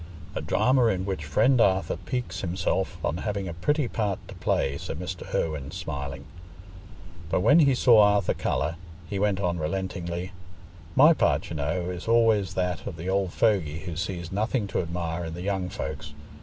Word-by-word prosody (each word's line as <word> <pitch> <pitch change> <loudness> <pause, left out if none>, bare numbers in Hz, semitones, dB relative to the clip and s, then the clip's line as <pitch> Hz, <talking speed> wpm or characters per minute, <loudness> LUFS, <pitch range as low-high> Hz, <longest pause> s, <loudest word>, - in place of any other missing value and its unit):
"A - - -3
drama 120 +5 +3
in 95 -4 0
which 95 -6 -3
friend 115 - +3
Arthur 95 -2 +2
piques 110 -9 -4
himself 95 +1 -1
on 80 - -1
having 100 -1 -3
a 85 - -4
pretty 140 - 0
part 105 -4 -1
to - - -7
play," 70 - 0
said - - -5
Mr. 90 +1 -6
Irwine, 75 -4 -1
smiling. 70 0 -5 1.0
But 90 - +1
when 145 - +6
he 140 -4 +5
saw 120 -3 +6
Arthur 105 -2 +3
colour, 80 +3 -1 0.3
he 100 +3 -3
went 100 -1 +1
on 90 -3 -1
relentingly, 90 +1 -3 0.6
"My 150 +5 +8
part, 75 - +1
you - - -3
know, 85 +5 -1
is 90 +2 -7
always 115 -4 +3
that 90 -1 -1
of 85 - -6
the 85 +4 -4
old 95 -2 +1
fogy 85 -10 +1
who 85 -3 -6
sees 85 -1 -4
nothing 110 +3 0
to - - -1
admire 85 0 -3
in 80 0 -5
the 90 - -6
young 95 -2 -1
folks. - - -6
95 Hz, 180 wpm, -26 LUFS, 85-105 Hz, 1.0 s, My